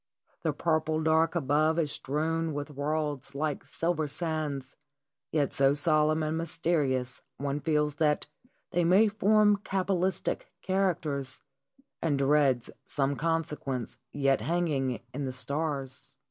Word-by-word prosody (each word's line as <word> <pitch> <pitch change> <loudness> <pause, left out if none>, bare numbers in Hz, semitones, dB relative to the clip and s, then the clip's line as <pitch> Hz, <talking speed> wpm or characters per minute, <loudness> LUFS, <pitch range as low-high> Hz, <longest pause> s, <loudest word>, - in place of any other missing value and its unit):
The 160 - +1
purple 155 0 0
dark 160 +1 +3
above 155 +1 +2
is 155 -4 +1
strewn 160 +2 -1
with 145 +1 -4
worlds 145 -1 -2
like 150 0 -2
silver 165 -2 -1
sands, 150 -4 -3 0.6
yet 145 -3 +1
so 135 +1 +4
solemn 155 +1 +3
and 155 +1 -1
mysterious 150 -7 0 0.2
one 140 +1 -2
feels 150 0 +1
that 150 -1 +2 0.5
they 175 -1 +2
may 190 +6 +5
form 210 0 +4
cabalistic 190 -1 -1 0.2
characters, 165 -9 -1 0.6
and 150 -4 +1
dreads 135 -3 +2
some 140 0 -1
consequence 150 -6 -2
yet 135 -2 +2
hanging 150 -7 0
in 140 +2 -3
the 130 - -2
stars. 140 -1 -3
150 Hz, 120 wpm, -29 LUFS, 140-165 Hz, 0.6 s, may